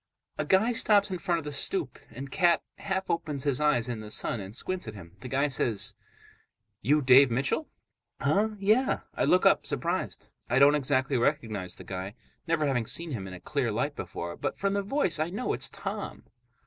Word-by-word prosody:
A 150 - 0
guy 195 +9 +3
stops 210 -4 +4
in 185 - -3
front 175 -1 0
of 160 - -6
the 150 - -4
stoop, 365 - -1
and 135 +2 -8
Cat 175 +1 +3 0.2
half 190 -1 -2
opens 150 -5 -2
his 140 -1 0
eyes 145 -6 +2
in 120 -3 -4
the 105 -1 -8
sun 110 - -2
and 100 +2 -7
squints 185 +2 -3
at 110 - -7
him. 85 -2 -12
The - - -7
guy 135 +3 +1
says, 120 -6 0 0.9
"You 145 +6 +3
Dave 130 +1 +7
Mitchell?" 135 - 0 0.5
"Huh? 215 +2 +1
Yeah." 215 +7 +2
I - - 0
look 185 - +3
up, - - +4
surprised. - - -3 0.2
I 125 - +2
don't 140 +2 +7
exactly 135 -2 +1
recognize 110 -8 -1
the - - -11
guy, 95 +2 -6 0.3
never 165 -2 +1
having 125 -5 0
seen 170 -1 -3
him 100 -8 -4
in 95 - -8
a - - -10
clear - - -1
light - - -1
before. 85 0 -6
But - - -3
from 195 0 0
the 200 - +1
voice 200 - 0
I 155 +2 0
know 210 +8 -2
it's - - 0
Tom. - - -6
145 Hz, 200 wpm, -28 LUFS, 120-185 Hz, 0.9 s, Dave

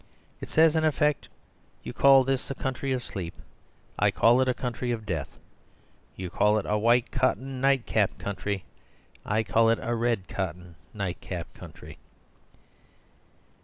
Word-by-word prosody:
It - - -8
says 160 0 +4
in 160 - +2
effect, 150 -1 +1 0.5
"You - - -6
call 135 -1 +6
this 135 0 -1
a 135 - -4
country 130 +1 -3
of 125 -2 -2
sleep, 90 -5 -6 0.6
I - - +4
call 120 +3 +4
it 130 - +1
a 125 - +2
country 125 0 -4
of 115 -3 -3
death. 80 -8 -4 0.8
You 90 -2 -6
call 105 +3 +3
it 105 - -2
'White 115 +3 +2
Cotton 130 0 -1
Night 135 -2 +2
Cap 105 -3 0
Country'; 100 -1 -4 0.6
I 110 +2 +1
call 115 +2 +3
it 115 - +3
'Red 115 -4 -1
Cotton 90 -2 -5 0.2
Night 100 -4 -4
Cap 85 -3 -6
Country.'" - - -12
115 Hz, 150 wpm, -27 LUFS, 100-130 Hz, 0.8 s, call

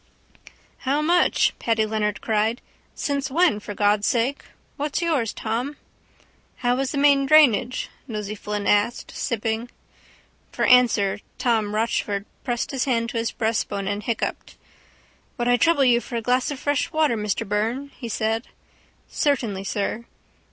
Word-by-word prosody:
—How 280 +3 0
much? 350 +3 +3
Paddy 225 -2 +1
Leonard 210 -1 -1
cried. 220 +2 0 0.4
Since 280 -2 -2
when, 320 -5 +3
for 205 0 -8
God' 205 0 +2
sake? 245 +6 0 0.3
What's 295 0 -2
yours, 285 -10 +1
Tom? 240 +7 -3 0.8
—How 245 0 +1
is 270 -1 0
the 290 - -3
main 280 -1 +4
drainage? 255 -4 +4 0.2
Nosey 210 -3 -4
Flynn 210 -1 -4
asked, 205 +4 +1
sipping. 225 +1 -2 0.8
For - - 0
answer 220 -5 +4 0.2
Tom 225 -5 0
Rochford 210 -2 -1 0.2
pressed 240 -3 -2
his 270 -2 -1
hand 235 -3 0
to 235 - -4
his 230 0 0
breastbone 205 -3 -2
and 205 +1 -2
hiccupped. 225 +1 -3 0.8
—Would 240 - -1
I 245 - +5
trouble 305 -1 +3
you 240 -1 +4
for 240 - -7
a 230 - -1
glass 250 +2 +1
of 290 - -4
fresh 285 0 -1
water, 310 -6 +2
Mr 210 0 -2
Byrne? 225 +7 -1
he 240 -4 -7
said. 225 +2 -1 0.6
—Certainly, 230 -10 -1
sir. 210 +3 -2
235 Hz, 145 wpm, -23 LUFS, 210-270 Hz, 0.8 s, I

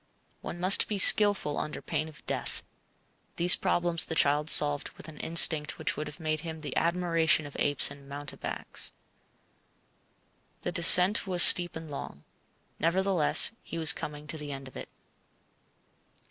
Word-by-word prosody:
One 175 - -9
must 185 +3 +2
be 210 - -5
skilful 200 -6 +4
under 150 - -7
pain 155 - -5
of 150 -3 -19
death. - - -4 0.7
These 175 +1 +5
problems 170 -1 0
the 160 - -5
child 150 +1 +1
solved 145 -1 +5
with - - -13
an 155 -2 -12
instinct 160 -2 0
which - - -4
would 150 - -7
have 150 - -12
made 155 -1 -4
him 160 -2 -9
the 145 -3 -8
admiration 165 -2 -1
of 145 - -13
apes 145 -1 0
and 140 0 -15
mountebanks. 145 0 -4 1.7
The 175 - -4
descent 180 +3 +4
was 180 -2 +5
steep 175 -1 +5
and 160 -2 -10
long. 75 - -10 0.6
Nevertheless 180 +1 +1
he 165 - -10
was 160 +1 +4
coming 150 0 -10
to 155 +1 -8
the 150 -1 -9
end 135 -1 -10
of 130 - -17
it. - - -10
160 Hz, 155 wpm, -26 LUFS, 150-175 Hz, 1.7 s, These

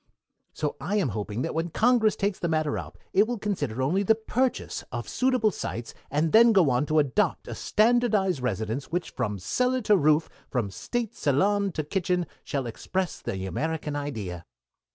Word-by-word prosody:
So 150 -2 -3
I 205 - -1
am 195 -10 +2
hoping 105 +3 -3
that - - -2
when 165 +2 -1
Congress 225 +3 +3
takes 200 -1 -1
the 170 - -1
matter 155 -2 0
up - - -6 0.2
it 205 +3 +5
will 240 0 -2
consider 145 - -2
only 175 +9 +2
the 220 +3 +4
purchase 245 +3 -1
of - - -4
suitable 255 -4 +2
sites, 115 -9 -5 0.2
and 155 +3 +1
then 230 +1 +7
go 175 -9 +5
on 125 +4 +1
to 155 - +1
adopt 145 -4 +1
a - - -5
standardized 215 - +2
residence 110 +2 -2
which 175 +1 -2
from 105 -5 -2
cellar 250 - 0
to 210 -2 +4
roof, 155 -2 +3 0.2
from 115 -7 -1
state 240 - -3
salon 195 +8 +1
to 155 - -2
kitchen, 180 +2 0 0.2
shall 135 -2 -2
express 185 +10 -3
the 95 -1 -4
American 150 - -2
idea." 105 - -5
165 Hz, 175 wpm, -27 LUFS, 130-210 Hz, 0.2 s, then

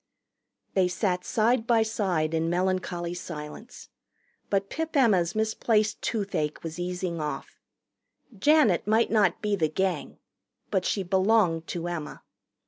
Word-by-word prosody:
They 190 -2 +3
sat 180 0 -1
side 230 +1 +1
by 230 -2 +4
side 185 -8 -1
in 165 0 0
melancholy 175 -1 -1
silence. 170 +6 -8 0.6
But 195 -1 +1
Pip 320 +5 -4
Emma's 190 -9 +3
misplaced 220 0 +1
toothache 195 -9 -2
was 165 +1 -6
easing 180 -1 -3
off. 150 0 -5 0.8
Janet 230 - +3
might 220 +2 +3
not 205 -5 +2
be 210 -1 +1
the 160 -5 +1
Gang. 190 +4 -2 0.5
But 190 -2 +1
she 195 - 0
belonged 185 -3 +2
to 175 0 -4
Emma. 170 -4 -5
190 Hz, 130 wpm, -27 LUFS, 170-220 Hz, 0.8 s, by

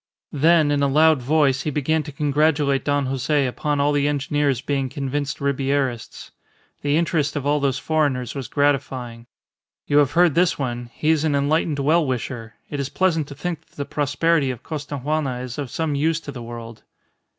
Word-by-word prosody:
Then 155 +1 +4
in 145 -1 +1
a 140 - +3
loud 155 0 +4
voice 140 0 +2
he 150 - -2
began 150 +2 0
to 150 - -8
congratulate 145 -1 +1
Don 145 -1 +1
Jose 135 +2 0
upon 145 +3 -1
all 145 +1 +3
the 145 0 +1
engineers 145 -2 0
being 135 -1 -2
convinced 140 +1 -3
Ribierists. 135 -3 -2 0.5
The 145 +1 +1
interest 160 -3 0
of 145 -2 -3
all 145 +1 +2
those 140 -2 0
foreigners 140 -6 0
was 135 -5 -5
gratifying. 130 -4 -1 0.6
"You 145 - +2
have 145 -1 +2
heard 175 -2 +4
this 175 +2 +2
one. 120 -3 -4
He 155 +6 0
is 160 -2 +2
an 155 -3 +1
enlightened 145 +2 +1
well 155 +4 +3
wisher. 120 -4 -4
It 145 - -5
is 140 -1 -2
pleasant 165 -5 +1
to 140 - -9
think 175 -1 -5
that - - -30
the 140 - -4
prosperity 145 +1 +1
of 125 -3 -5
Costaguana 145 -3 -3
is 125 +1 -6
of 140 -3 -4
some 160 +3 -2
use 155 +3 +1
to 145 - -7
the 125 - -8
world." 115 -1 -8
145 Hz, 185 wpm, -22 LUFS, 135-150 Hz, 0.6 s, Then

